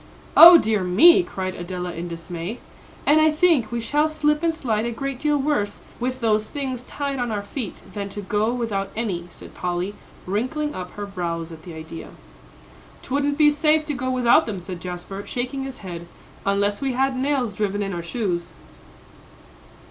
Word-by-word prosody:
"O 340 +1 +12
dear 215 - +1
me!" 290 - +7
cried 185 - -4
Adela, 180 0 -5
in 170 +1 -5
dismay. 170 +5 -6 0.5
"And 310 +2 +5
I 315 - +6
think 305 -7 +3
we 235 - -1
shall 295 +7 +1
slip 300 -1 +1
and 335 -1 +2
slide 225 -7 -1
a - - -2
great 275 +2 -4
deal 295 0 +2
worse 270 -8 -1 0.2
with 255 +1 -2
those 215 -1 +2
things 260 -4 -3
tied 280 -2 -3
on 245 -1 -1
our 205 -1 -2
feet, 210 0 -6
than 200 0 -4
to 205 +1 -6
go 210 +3 +1
without 220 -5 -2
any," 190 -6 -3
said - - -13
Polly, 180 +2 -2 0.3
wrinkling 255 +10 -2
up 180 -1 -7
her 205 - -5
brows 170 -4 -4
at 160 -1 -10
the 170 0 -10
idea. 160 +1 -8 0.9
"'Twouldn't 285 +1 0
be 300 -1 +6
safe 305 +1 +2
to 300 - -2
go 255 -1 -3
without 255 +3 +4
them," 205 -4 -3
said 180 -1 -8
Jasper, 180 +2 -6
shaking 255 +2 -3
his 260 -6 -8
head, 170 -2 -7 0.4
"unless 200 +2 +1
we 270 -2 0
had 265 +1 +1
nails 260 -4 0
driven 205 0 -1
in 195 -1 -3
our 170 - -3
shoes." 175 -2 -3
220 Hz, 180 wpm, -23 LUFS, 185-275 Hz, 0.9 s, O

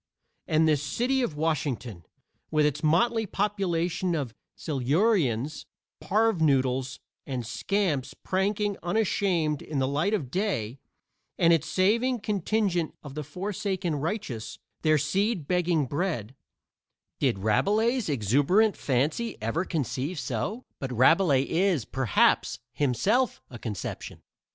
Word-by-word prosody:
And 160 +1 +3
this 150 -3 +3
city 250 - 0
of 170 -12 -2
Washington, 140 - -2 0.4
with 155 -1 +3
its 150 0 0
motley 220 +8 +2
population 180 -3 -1
of 135 -7 -3 0.2
silurians, 150 - 0 0.3
parvenoodles 140 - +1 0.3
and 130 -4 -3
scamps 150 - -1
pranking 200 +2 -1
unashamed 175 -5 0
in 150 - -5
the 130 -1 +1
light 155 +10 +1
of 135 -11 -4
day, 140 - -2 0.6
and 170 -1 +5
its 165 - +1
saving 230 +7 +2
contingent 200 -4 0
of 145 -3 -9
the 150 +1 -4
forsaken 185 +2 -3
righteous, 140 - -4 0.2
their 155 -1 +4
seed 180 +3 0
begging 175 -4 +1
bread, 140 - -2 0.9
did - - +1
Rabelais' 210 - +1
exuberant 145 - +3
fancy 150 - -1
ever 115 - -1
conceive 145 - -2
so 180 - -3
but 135 -2 -4
Rabelais 135 - +4
is, 165 - +1
perhaps, 130 -3 +2 0.2
himself 150 - +1
a 120 - -8
conception. 105 -5 -6
160 Hz, 115 wpm, -27 LUFS, 135-200 Hz, 0.9 s, and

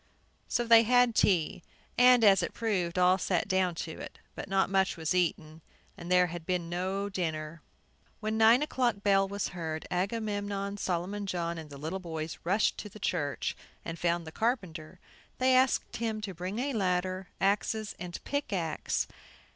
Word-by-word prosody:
So 240 - 0
they 230 -1 +7
had 245 +1 +4
tea, 180 -5 +2 0.3
and, 250 -1 +6
as 195 -3 +6
it - - -4
proved, 185 -7 -1
all 180 +1 +4
sat 180 -2 0
down 185 -3 +1
to 160 - -7
it. - - -9 0.2
But - - -7
not 195 0 +2
much 190 -1 +1
was 160 +1 -1
eaten, 165 -3 -1 0.3
as 170 - -9
there 180 0 +5
had 175 -1 -6
been 175 -1 -2
no 190 +3 -2
dinner. 160 -4 -4 0.6
When 215 0 -2
the 220 - +3
nine 235 +5 +6
o'clock 245 -8 0
bell 195 -1 +4
was 200 0 -3
heard, 160 -3 -5
Agamemnon, 200 +1 -2
Solomon 190 +2 -2
John, 170 -2 -2
and 155 -2 -9
the 140 - -10
little 160 +7 -4
boys 160 -3 -5
rushed 195 +6 +1
to 210 - -6
the 210 - -12
church, 145 -9 -2 0.3
and 165 0 -5
found 170 -1 0
the 160 - -8
carpenter. 185 -9 -2 0.4
They 255 0 +4
asked 255 0 +2
him 225 -1 -2
to 200 -2 -5
bring 180 +4 -5
a 275 +3 -1
ladder, 185 -2 -1
axes 210 +2 0
and 175 -1 -6
pickaxe. 190 - -2
190 Hz, 170 wpm, -30 LUFS, 170-215 Hz, 0.6 s, they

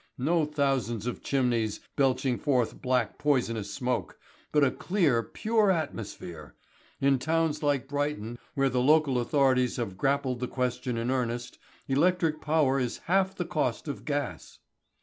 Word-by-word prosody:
No 155 +5 +2
thousands 135 -7 -1
of 125 - -4
chimneys 120 -5 0 0.2
belching 130 -2 +1
forth 130 -6 0
black 125 -3 0
poisonous 115 -8 0
smoke, 125 +3 -2 0.3
but 150 -1 +4
a 135 - +4
clear, 165 - +1
pure 215 - +1
atmosphere. 105 - -4 0.4
In 135 -1 +3
towns 160 +1 0
like 145 -3 +1
Brighton, 145 -5 -3 0.2
where 135 -1 +2
the 125 0 +1
local 145 -1 +4
authorities 130 -1 +2
have 105 -6 -3
grappled 135 -2 +1
the 125 - -2
question 125 -1 -2
in 115 +2 -1
earnest, 120 -1 -2 0.3
electric 160 +2 +2
power 150 -3 +2
is 125 -2 -2
half 190 +2 +2
the 175 - -3
cost 155 -6 -1
of 145 - -5
gas. 145 -1 -4
135 Hz, 145 wpm, -28 LUFS, 125-150 Hz, 0.4 s, but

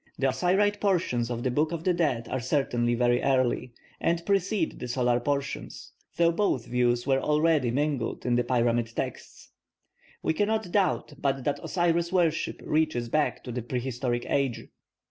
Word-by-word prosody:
The 135 - 0
Osiride 190 +9 +1
portions 165 - +1
of 120 -1 -3
the 130 - 0
Book 150 +5 +1
of 165 -1 -4
the 180 - +2
Dead 140 -9 0
are 130 - -2
certainly 120 -2 0
very 120 0 +2
early, 130 -2 +1 0.3
and 170 0 0
precede 195 -2 0
the 125 - -5
solar 125 -1 +1
portions, 140 +2 -4 0.3
though 170 0 +4
both 170 - 0
views 120 0 +1
were 135 -1 +2
already 150 -3 +2
mingled 140 -2 -1
in 125 - +1
the 120 0 +2
pyramid 120 -2 +1
texts. - - -6 0.7
We - - +1
cannot 210 +1 0
doubt 185 -6 +1
but 135 -2 0
that 145 +2 0
the - - -10
Osiris 170 -1 +1
worship 170 -4 0
reaches 155 -7 0
back 150 +4 0
to 125 - -6
the 125 +1 -3
prehistoric 125 0 -2
age. 135 -4 -1
135 Hz, 165 wpm, -27 LUFS, 120-170 Hz, 0.7 s, though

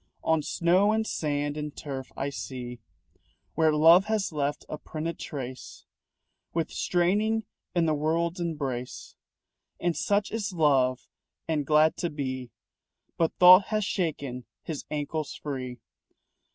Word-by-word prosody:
On 160 -1 +2
snow 180 +6 +3
and 220 0 +1
sand 145 -4 -2
and 150 -1 -5
turf, 135 -3 -6
I 140 +1 -2
see 125 -3 -6 0.7
Where 160 0 +3
Love 165 +5 +6
has 215 -3 0
left 145 -1 -2
a 155 - -6
printed 165 +2 -5
trace 130 -4 -7 0.7
With 165 -1 -1
straining 210 +6 +1 0.3
in 170 -1 +3
the 155 - +2
world's 165 +4 0
embrace. 140 -7 -4 0.7
And 175 -2 0
such 205 0 0
is 220 -3 -3
Love 135 -6 +2 0.4
and 150 -4 -1
glad 155 +1 +4
to 175 - -1
be. 130 -4 -4 0.7
But 165 -1 0
Thought 185 +2 +9
has 215 -2 -1
shaken 140 - -2 0.2
his 155 -4 -5
ankles 150 0 -3
free. 130 -4 -5
155 Hz, 130 wpm, -27 LUFS, 140-175 Hz, 0.7 s, Thought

